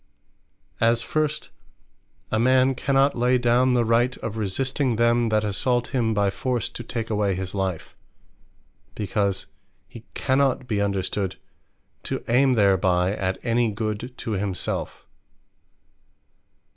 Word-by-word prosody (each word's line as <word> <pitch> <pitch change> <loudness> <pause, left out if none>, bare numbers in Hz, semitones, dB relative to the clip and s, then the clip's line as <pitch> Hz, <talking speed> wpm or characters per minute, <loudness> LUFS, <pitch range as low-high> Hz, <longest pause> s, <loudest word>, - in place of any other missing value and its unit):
As 115 +1 +3
first 150 -1 -2 0.8
a 110 - +1
man 130 +2 +4
cannot 135 +2 +2
lay 125 +1 +3
down 125 +1 +3
the 120 -1 +2
right 120 +3 +2
of 110 -1 -5
resisting 125 +5 0
them, 120 0 +2
that 110 0 +1
assault 120 +4 0
him 115 -4 0
by 100 -1 +2
force, 125 +2 -2
to 120 - -7
take 115 -1 -4
away 105 -3 +1
his 95 0 -5
life; 95 -4 -3 1.0
because 100 -2 -1 0.4
he 115 - -12
cannot 130 -1 +1
be 105 -4 0
understood 100 -1 -1 0.7
to - - -4
ayme 130 +2 +3
thereby, 95 -2 +2
at 95 -2 -2
any 115 -1 +1
Good 110 +3 -4
to 115 - -5
himselfe. 100 -3 -3
115 Hz, 125 wpm, -24 LUFS, 100-125 Hz, 1.0 s, man